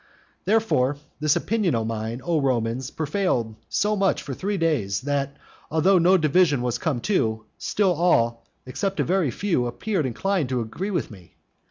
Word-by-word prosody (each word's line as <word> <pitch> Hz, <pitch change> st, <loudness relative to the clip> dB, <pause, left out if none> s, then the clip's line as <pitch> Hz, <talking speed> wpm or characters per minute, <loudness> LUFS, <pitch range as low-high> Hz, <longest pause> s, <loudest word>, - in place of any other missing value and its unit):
Therefore, 190 Hz, -, +2 dB, 0.2 s
this 150 Hz, -1 st, +2 dB
opinion 210 Hz, -, 0 dB
of 115 Hz, -1 st, -1 dB
mine, 115 Hz, +2 st, -4 dB
O 160 Hz, 0 st, +1 dB
Romans, 125 Hz, -1 st, 0 dB
prevailed 150 Hz, -, -1 dB, 0.2 s
so 210 Hz, +1 st, +1 dB
much 195 Hz, -2 st, +1 dB
for 140 Hz, -, -5 dB
three 200 Hz, +8 st, -2 dB
days, 135 Hz, -, 0 dB
that 140 Hz, 0 st, -2 dB, 0.3 s
although 180 Hz, +4 st, +4 dB
no 180 Hz, +3 st, +5 dB
division 155 Hz, -4 st, +3 dB
was 125 Hz, -2 st, -1 dB
come 145 Hz, -8 st, -1 dB
to, 110 Hz, -, 0 dB
still 195 Hz, -3 st, +1 dB
all, 120 Hz, -9 st, +2 dB, 0.2 s
except 195 Hz, +10 st, -3 dB
a -, -, +3 dB
very 185 Hz, -5 st, +1 dB
few, 145 Hz, -, 0 dB
appeared 170 Hz, -, -1 dB
inclined 170 Hz, -, -1 dB
to 130 Hz, -1 st, 0 dB
agree 140 Hz, -, -4 dB
with 175 Hz, -, -2 dB
me. 95 Hz, -5 st, -15 dB
150 Hz, 165 wpm, -24 LUFS, 120-185 Hz, 0.3 s, no